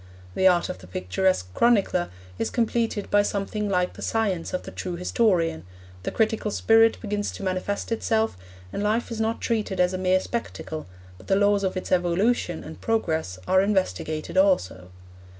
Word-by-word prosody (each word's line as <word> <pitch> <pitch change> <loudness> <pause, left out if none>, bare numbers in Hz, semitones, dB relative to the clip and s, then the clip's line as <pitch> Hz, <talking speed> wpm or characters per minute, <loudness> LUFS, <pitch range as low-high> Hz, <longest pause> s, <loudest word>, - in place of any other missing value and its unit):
The 190 - +4
art 175 -2 +4
of - - -6
the 90 - -13
picturesque 90 - -1
chronicler 200 -7 +2 0.3
is 115 - 0
completed 230 -3 -1
by 205 - +5
something 205 +1 -2
like 180 -2 +1
the - - -11
science 200 -7 -1
of 185 - -3
the - - -8
true 180 -1 -4
historian, 175 -3 +1 0.4
the - - -3
critical 220 -1 0
spirit 225 +2 +4
begins 205 -1 -2
to - - -8
manifest 190 +3 -2
itself, 225 0 +1 0.4
and - - -2
life 220 +4 0
is 225 -1 -3
not 225 +1 -1
treated 215 -5 -1
as 180 +1 +3
a 185 - -2
mere 185 0 +3
spectacle, 185 - -5 0.3
but - - -16
the 195 - +3
laws 205 0 +3
of 190 -1 -1
its 185 - -5
evolution 180 0 +1
and 160 - -10
progress 160 - -1
are 190 0 +5
investigated 170 - -1
also. 100 - +2
190 Hz, 170 wpm, -25 LUFS, 175-220 Hz, 0.4 s, by